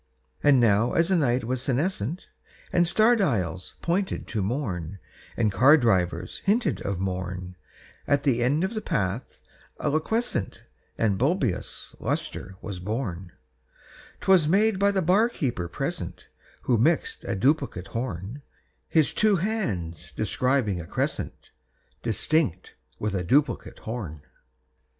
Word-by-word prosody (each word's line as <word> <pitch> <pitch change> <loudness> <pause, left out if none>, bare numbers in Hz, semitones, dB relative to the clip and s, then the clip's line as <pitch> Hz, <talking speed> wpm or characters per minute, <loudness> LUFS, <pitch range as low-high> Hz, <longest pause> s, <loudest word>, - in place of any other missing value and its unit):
And 140 -3 +5
now 115 0 +3
as 170 +2 +3
the 190 - +3
night 130 -6 +2
was 125 +2 -2
senescent, 140 - -1 0.4
And 175 -1 +4
star 220 +7 +5
dials 95 - -1
pointed 185 +3 -1
to 110 - -1
morn, 100 - -3 0.4
And 110 -3 +2
car 130 +10 +6
drivers 90 - 0
hinted 195 - +1
of 100 -2 -2
morn, 90 -1 -4 0.5
At 140 -1 +2
the 125 -4 +2
end 140 +7 +2
of 190 - -1
the 215 - -3
path 100 - -3 0.4
a 150 - 0
liquescent 160 - -1 0.3
And 105 -4 +1
bibulous 140 - -1
lustre 95 - -3
was 100 -4 -5
born; 95 -4 -4 0.9
'Twas 190 -6 +5
made 205 +2 +3
by 200 0 +4
the 195 -2 +1
bar 200 +8 +4
keeper 120 - -2
present, 85 - -5 0.3
Who 120 -3 +2
mixed 155 +8 +1
a - - -1
duplicate 130 - 0
horn, 115 - -4 0.5
His 160 -3 +3
two 215 -1 +3
hands 120 - -2
describing 125 -8 0
a 80 - -10
crescent - - -3 0.5
Distinct 115 - 0 0.2
with 105 -1 -2
a 95 -2 -1
duplicate 130 - +1
horn. 95 -11 -6
125 Hz, 130 wpm, -26 LUFS, -, 0.9 s, car